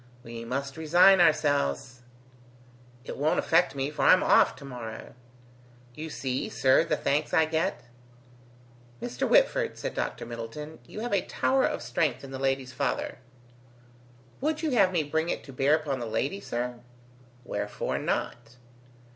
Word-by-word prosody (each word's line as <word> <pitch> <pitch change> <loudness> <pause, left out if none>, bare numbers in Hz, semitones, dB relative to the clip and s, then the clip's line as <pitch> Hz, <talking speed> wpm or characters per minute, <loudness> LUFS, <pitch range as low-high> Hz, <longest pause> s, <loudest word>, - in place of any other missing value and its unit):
"We 115 -1 -8
must 140 +4 -4
resign 175 +4 +6
ourselves." 145 - +1 1.1
"It - - -6
won't 150 +3 +1
affect 165 -2 +2
me, 135 +1 -2
for 150 - -5
I'm - - +6
off - - +4
to - - -12
morrow." 120 -4 -8 0.8
"You 155 +4 -7
see, 130 -3 -3
sir, 130 +4 +3
the 155 -2 -1
thanks 150 +2 0
I 160 -2 +5
get." 160 +1 -1 1.2
"Mr. 240 - -3
Whitford," - - +3
said - - -4
Dr. - - -3
Middleton, 120 +7 -7
"You 215 - -7
have 240 -2 -3
a 195 - +3
tower 265 0 +1
of - - -2
strength 160 -4 -1
in 135 - -9
the 135 - -6
lady's 135 -1 -1
father." - - -2 1.2
"Would 310 +3 -1
you 310 - 0
have 200 -7 +4
me 170 -4 +1
bring 160 +3 -1
it - - -2
to 135 - -11
bear 135 +4 +3
upon 145 -4 -3
the 120 - -4
lady, 140 - -2
sir?" 120 -7 -4 0.7
"Wherefore - - -3
not?" 120 0 -3
145 Hz, 155 wpm, -28 LUFS, 130-170 Hz, 1.2 s, resign